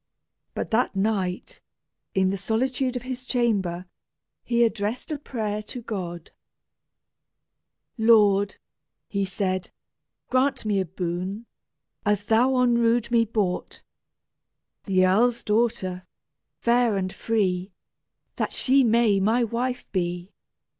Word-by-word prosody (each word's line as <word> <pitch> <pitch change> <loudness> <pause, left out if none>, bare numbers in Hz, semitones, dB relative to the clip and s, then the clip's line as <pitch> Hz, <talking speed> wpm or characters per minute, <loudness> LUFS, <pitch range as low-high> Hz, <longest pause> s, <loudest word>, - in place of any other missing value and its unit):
But - - -4
that 225 -1 +1
night, 195 -3 -1 0.5
in 190 -1 +3
the - - -1
solitude 250 +6 -1
of 245 - -3
his 255 -1 -5
chamber, 200 -9 0 0.6
he 235 0 +2
addressed 225 +4 -1
a 300 - -3
prayer 215 -7 -3
to 235 +3 -8
God: 175 -7 -5 1.7
"Lord," 205 -3 +4 0.5
he 200 -2 -1
said, 185 -1 -2 0.6
"grant 260 -1 +1
me 205 -2 +1
a 190 - 0
boon, 185 +5 -4 0.6
As 205 -1 +1
thou 240 +5 +3
on 245 -2 +3
rood 235 0 +2
me 230 -1 +4
bought! 205 -5 -2 1.0
The 185 -2 +3
erle's 230 +6 +2
daughter, 200 -5 0 0.5
fair 235 -3 +2
and 185 -1 -2
free, 195 -4 -1 0.7
That - - -1
she 270 +1 +4
may 225 -3 +3
my 225 +5 +2
wife 245 +3 -2
be! 175 -1 -2
215 Hz, 115 wpm, -25 LUFS, 190-235 Hz, 1.7 s, Lord